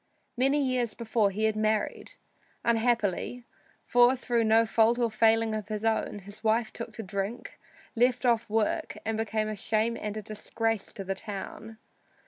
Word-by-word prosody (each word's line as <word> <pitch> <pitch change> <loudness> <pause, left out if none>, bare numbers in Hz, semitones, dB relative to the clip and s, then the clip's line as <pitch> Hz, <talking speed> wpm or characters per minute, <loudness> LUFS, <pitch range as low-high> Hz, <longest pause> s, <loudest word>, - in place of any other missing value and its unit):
Many 270 +4 +2
years 250 -3 0
before 225 -3 +1
he 205 +3 -3
had 220 0 +2
married; 215 0 -1 0.5
unhappily, 235 0 0 0.4
for 245 +1 +5
through 240 -2 0
no 225 +1 +5
fault 225 +1 +3
or 235 -2 +1
failing 225 0 +3
of 215 -2 -4
his 215 0 -4
own, 220 -2 0
his 205 +2 -11
wife 225 +1 +1
took 230 -1 -6
to 225 - -6
drink, 200 +4 -5 0.4
left 250 +2 +2
off 235 -2 +2
work, 215 0 0
and 225 0 -1
became 220 -1 -1
a 215 - -3
shame 220 +3 0
and 210 -1 -4
a 215 - -5
disgrace 220 +1 -2
to 195 - -6
the 195 0 -2
town. 210 +3 -7
225 Hz, 165 wpm, -28 LUFS, 215-235 Hz, 0.5 s, for